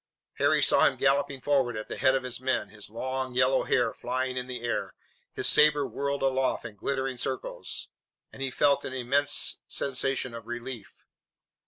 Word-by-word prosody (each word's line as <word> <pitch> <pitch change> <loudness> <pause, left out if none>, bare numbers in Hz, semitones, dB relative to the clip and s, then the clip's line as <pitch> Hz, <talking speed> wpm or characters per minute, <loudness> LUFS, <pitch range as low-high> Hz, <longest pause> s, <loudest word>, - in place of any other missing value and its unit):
Harry - - +3
saw - - +5
him - - 0
galloping 140 0 +1
forward 130 -4 +1
at 110 - -6
the - - -5
head 130 0 +4
of 135 - -1
his 125 -1 -4
men, 130 -5 0
his 105 -1 -8
long, 130 +3 -4
yellow 130 +1 +3
hair 125 - +2
flying 130 +1 -3
in 125 0 -3
the 125 -2 -5
air, 120 - -2 0.4
his - - -4
sabre 150 -1 +5
whirled 140 0 -3
aloft 135 -2 +1
in 110 -3 -8
glittering 130 +3 -2
circles, - - -4 0.5
and - - -11
he 135 - 0
felt 140 +2 +2
an 130 - -5
immense 135 +3 +2
sensation 135 -2 0
of 115 -1 -9
relief. 120 -2 -7
130 Hz, 175 wpm, -28 LUFS, 120-135 Hz, 0.5 s, saw